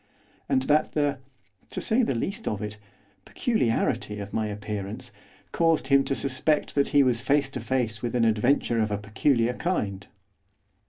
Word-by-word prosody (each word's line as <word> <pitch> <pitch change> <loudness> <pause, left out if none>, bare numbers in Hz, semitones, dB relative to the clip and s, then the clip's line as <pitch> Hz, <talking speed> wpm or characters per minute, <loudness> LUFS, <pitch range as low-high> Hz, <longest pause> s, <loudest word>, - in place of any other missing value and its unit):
And 130 - +2
that 150 +3 +2
the 145 -2 0 0.5
to - - -4
say 225 +4 +2
the 220 - 0
least 200 - -3
of 105 - -1
it 105 0 -6 0.4
peculiarity 115 - 0
of 100 0 -7
my 110 -1 0
appearance, 105 0 -5 0.4
caused 165 -5 +2
him 140 0 +5
to 135 - 0
suspect 140 +3 0
that 140 -1 +2
he 145 -1 +4
was 120 -3 +1
face 140 +1 +1
to - - -4
face 115 -5 -1
with 120 0 -3
an 120 -2 +3
adventure 115 +1 +2
of 110 - 0
a 105 - -1
peculiar 115 +4 +1
kind. 105 - -2
125 Hz, 165 wpm, -26 LUFS, 105-145 Hz, 0.5 s, him